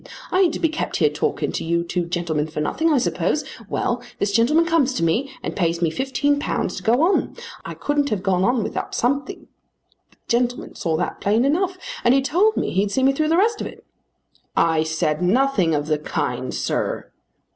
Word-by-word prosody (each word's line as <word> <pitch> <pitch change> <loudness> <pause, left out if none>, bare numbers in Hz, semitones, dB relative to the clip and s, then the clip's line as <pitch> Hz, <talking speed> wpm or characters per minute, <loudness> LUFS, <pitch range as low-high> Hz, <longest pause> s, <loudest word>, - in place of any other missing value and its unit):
I 370 - +2
ain't 355 -4 +4
to - - -4
be 330 - +3
kept 315 +1 -3
here 150 -3 +3
talking 150 - -1
to - - -3
you 170 +1 0
two 175 0 -2
gentlemen 170 -3 -1
for 155 -1 -6
nothing, 320 - +1
I 295 - +4
suppose. 290 +4 0 0.3
Well; 240 0 -1 0.2
this 200 - 0
gentleman 265 +10 +3
comes 310 -6 +2
to - - -1
me 230 +12 +1
and - - -4
pays 170 -3 0
me 165 -2 +1
£15 285 - -1
to - - -5
go 240 +7 +3
on. 380 +4 +1 0.3
I - - -7
couldn't 290 -1 0
have 205 -5 -2
gone 190 -2 +2
on 240 +1 +2
without - - -4
something. 265 +3 -1 0.6
The - - -29
gentleman 245 +1 0
saw 160 -2 -1
that - - -3
plain 220 +5 +2
enough. 365 +6 +1 0.3
And 245 - +5
he 270 - +4
told 360 +10 +2
me - - 0
he'd 200 +2 +1
see 260 +6 0
me 270 +1 +4
through 305 +2 0
the 330 - +3
rest 435 +3 +2
of - - -3
it." - - -13 0.7
"I 160 -1 +3
said 160 -1 -1
nothing 195 - +2
of 145 0 -1
the 155 -1 0
kind, 150 - -3
sir." - - -2
240 Hz, 205 wpm, -22 LUFS, -, 0.7 s, And